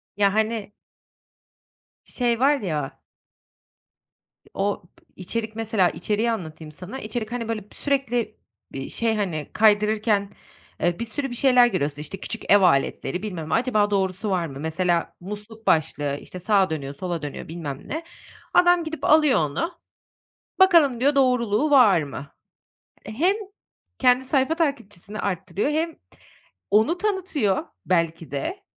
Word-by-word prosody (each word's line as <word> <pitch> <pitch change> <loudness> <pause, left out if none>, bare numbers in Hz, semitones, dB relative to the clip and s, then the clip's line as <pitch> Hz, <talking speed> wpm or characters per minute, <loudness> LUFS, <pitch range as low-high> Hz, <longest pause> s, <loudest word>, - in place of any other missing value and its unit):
Ya, 200 -1 +4
hani 220 -1 -1 1.3
şey 240 -2 0
var 285 +3 +4
ya 150 -8 -4 1.5
o 200 +1 -1
p - - -26
içerik, 220 +4 -4
mesela, 220 -5 +1
içeriği 220 +3 -1
anlatayım 160 -6 -6
sana. 185 - -8
İçerik, 215 +1 -4
hani, 240 -2 -3
böyle, 215 -2 -2
sürekli 270 -5 -1 0.3
bir 135 0 -6
şey, 230 -1 0
hani, 175 -8 -3
kaydırırken, 210 -1 +3 0.5
eee, 175 0 +1
bir 235 - -2
sürü 270 +5 -3
bir 245 - -5
şeyler 250 -1 +5
görüyorsun, 145 -8 -2
işte, 175 +5 -7
küçük 225 +1 -4
ev 205 0 +7
aletleri 175 +1 +1
bilmem 170 -7 -5
ne, - - -1
acaba 215 -4 +2
doğrusu 195 +1 0
var 180 -3 0
mı? 135 -2 -9
Mesela 170 +2 0
musluk 210 +4 -9
başlığı, 145 -2 +1
işte, 180 - -9
sağa 195 0 +2
dönüyor 140 -3 -4
sola 175 +2 -4
dönüyor 145 -2 -6
bilmem 155 -5 -6
ne. 320 +3 -3 0.5
Adam 355 -1 +5
gidip 320 0 -5
alıyor 305 -3 +5
onu, 155 - -1 0.9
bakalım 330 -10 +5
diyor 280 +3 +2
doğruluğu 250 -1 +2
var 220 - +6
mı? 145 -1 -7 0.8
Hem 310 - +1 0.6
kendi 250 0 +4
sayfa 265 +3 +1
takipçisini 215 - -3
arttırıyor 200 - -2
hem 320 +2 -1 0.8
onu 220 - +3
tanıtıyor 365 - 0 0.2
belki 165 -4 0
de. 355 - -4
210 Hz, 135 wpm, -24 LUFS, 175-255 Hz, 1.5 s, ev